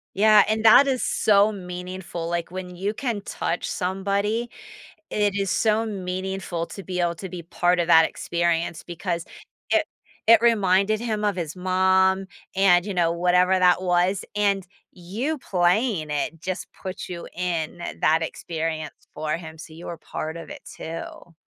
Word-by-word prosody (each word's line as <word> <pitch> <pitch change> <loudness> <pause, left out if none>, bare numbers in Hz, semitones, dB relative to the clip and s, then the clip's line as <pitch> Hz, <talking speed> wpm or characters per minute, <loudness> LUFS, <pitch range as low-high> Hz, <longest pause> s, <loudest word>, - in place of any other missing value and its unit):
Yeah, 210 +1 +6
and 220 +1 0
that 250 +5 +8
is 260 -2 0
so 205 0 +3
meaningful, 180 -2 -6
like, 170 0 -3
when 180 -1 -7
you 195 +4 -2
can 230 -4 -3
touch 175 -3 -3
somebody, 200 +5 -1 0.6
it 205 -1 +1
is 195 -1 -1
so 220 0 +2
meaningful 185 -3 -4
to 195 - -9
be 180 -1 -3
able 170 -1 0
to 190 +2 -7
be 175 -1 -7
part 175 +1 +1
of 170 - -1
that 165 -1 +7
experience, 170 -1 -1
because 170 -1 -3 0.5
it - - +3 0.4
it 230 -1 +8
reminded 210 -2 +3
him 215 -3 -2
of 205 - +1
his 170 -2 -5
mom, 190 +1 +2 0.3
and, 185 -2 +4
you 200 - -3
know, 170 -2 +2
whatever 180 +2 +3
that 180 0 +4
was, 180 +2 +1
and 200 -2 +1 0.3
you 210 - -3
playing 180 - +1
it 150 +2 -2
just 185 +1 -4
puts 185 -1 -6
you 175 -1 -6
in 175 -1 -3 0.2
that 160 +1 +3
experience 160 -1 -4
for 155 0 -2
him, 160 -2 -10
so 160 - -11
you 165 +2 -10
were 170 - -5
part 160 +1 -5
of 165 - -8
it - - -9
too. 165 +1 -8
180 Hz, 160 wpm, -24 LUFS, 170-200 Hz, 0.6 s, that